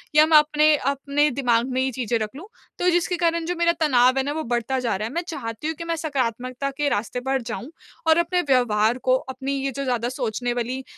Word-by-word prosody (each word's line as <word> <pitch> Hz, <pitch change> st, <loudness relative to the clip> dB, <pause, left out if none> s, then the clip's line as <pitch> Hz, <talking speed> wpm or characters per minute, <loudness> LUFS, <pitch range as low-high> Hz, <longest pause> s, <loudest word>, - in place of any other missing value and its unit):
या 305 Hz, 0 st, +7 dB
मैं 315 Hz, -1 st, +6 dB
अपने 300 Hz, 0 st, +4 dB
अपने 280 Hz, +2 st, 0 dB
दिमाग 240 Hz, -1 st, +2 dB
में 255 Hz, +1 st, 0 dB
ही 265 Hz, -, 0 dB
चीज़ें 240 Hz, -2 st, -1 dB
रख 215 Hz, -1 st, -2 dB
लूँ। 330 Hz, +8 st, -9 dB, 0.3 s
तो 360 Hz, -, +3 dB
जिसके 350 Hz, +1 st, +1 dB
कारण 335 Hz, 0 st, +1 dB
जो 355 Hz, +2 st, -2 dB
मेरा 340 Hz, 0 st, +3 dB
तनाव 255 Hz, -3 st, +4 dB
है 270 Hz, -, +2 dB
ना 285 Hz, -, -2 dB
वो 315 Hz, +1 st, -3 dB
बढ़ता 240 Hz, +2 st, -1 dB
जा -, -, +1 dB
रहा 210 Hz, +3 st, -3 dB
है। 235 Hz, -, -9 dB
मैं 340 Hz, -, -1 dB
चाहती 230 Hz, -3 st, -5 dB
हूँ 320 Hz, -, -2 dB
कि 335 Hz, -, -7 dB
मैं 335 Hz, 0 st, -2 dB
सकारात्मकता 255 Hz, -3 st, -2 dB
के 290 Hz, -, +2 dB
रास्ते 225 Hz, +1 st, -2 dB
पर 270 Hz, -1 st, +1 dB
जाऊँ 245 Hz, +5 st, -6 dB, 0.4 s
और 320 Hz, 0 st, +5 dB
अपने 345 Hz, +1 st, +1 dB
व्यवहार 235 Hz, -2 st, +3 dB
को 255 Hz, -, +6 dB
अपनी 265 Hz, +1 st, -5 dB
ये 275 Hz, -, -1 dB
जो 275 Hz, +2 st, -4 dB
ज़्यादा 245 Hz, -2 st, -1 dB
सोचने 245 Hz, 0 st, -1 dB
वाली 245 Hz, +2 st, -3 dB
265 Hz, 235 wpm, -23 LUFS, 245-310 Hz, 0.4 s, या